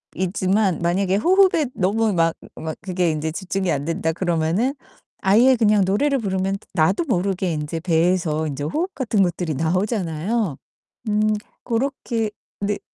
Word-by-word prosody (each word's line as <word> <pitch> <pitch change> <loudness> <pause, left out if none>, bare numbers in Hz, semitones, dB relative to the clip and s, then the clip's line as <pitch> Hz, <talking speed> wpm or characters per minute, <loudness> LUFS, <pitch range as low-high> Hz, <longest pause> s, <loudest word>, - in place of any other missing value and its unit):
호흡이지만 190 0 +1
만약에 185 +3 +1
'호흡에 360 - +4
너무 215 +3 +1
막 165 -1 +2 0.2
막 160 0 -5
그게 180 -3 0
인제 155 +1 -2
집중이 190 0 -2
안 145 0 -1
된다.' 165 -1 -1
그러면은 175 - 0 0.5
아예 235 +7 +5
그냥 210 -3 +3
노래를 275 +9 +2
부르면 195 -3 -1 0.2
나도 185 - +2
모르게 190 -3 0
인제 150 +2 -4
배에서 165 -2 +1
인제 145 0 -4
호흡 340 - -2
같은 230 -7 +1
것들이 175 -3 0
나오잖아요. 180 - -1 0.5
음 215 +1 +2 0.3
고렇게 235 -3 -1 0.3
네. 205 0 -1
190 Hz, 315 characters per minute, -22 LUFS, 165-215 Hz, 0.5 s, 아예